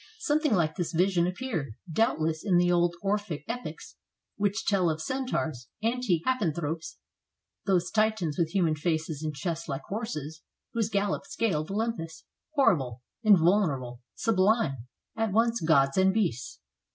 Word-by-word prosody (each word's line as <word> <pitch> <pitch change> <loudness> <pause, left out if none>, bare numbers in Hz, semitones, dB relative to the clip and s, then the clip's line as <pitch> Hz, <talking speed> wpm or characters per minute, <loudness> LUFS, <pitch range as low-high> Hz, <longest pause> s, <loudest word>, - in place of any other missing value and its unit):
Some 310 -9 +1
thing 300 -8 +2
like 160 -3 0
this 175 -1 -2
vision 175 0 +3
appeared, 180 - -3 0.2
doubtless, 160 -7 +1
in 190 -4 +3
the 175 0 +4
old 175 0 +2
Orphic 195 -7 -1
epics 245 +2 -6 0.4
which 205 +2 -1
tell 190 -4 +3
of 155 0 -2
centaurs, 160 - -2 0.2
antique 225 -8 +1
happan 235 -11 +1
thropes, 160 0 -4 0.7
those 180 -2 +2
titans 215 -8 +1
with 170 -3 +1
human 170 -3 +2
faces, 160 -1 -2
and 155 -1 -3
chests 165 +3 -4
like 135 +1 -3
horses, 160 - -4 0.3
whose 225 -2 0
gallop 200 -1 -1
scaled 170 -9 -1
Olympus, 200 -6 -3 0.3
horrible, 135 - +2 0.2
invulner 190 -5 +5
able, 125 -1 -9
sublime; 185 - +1 0.3
at 225 -2 0
once 230 +2 +2
gods 140 -1 +3
and 190 0 +5
beasts. 135 - -2
175 Hz, 145 wpm, -28 LUFS, 155-215 Hz, 0.7 s, invulner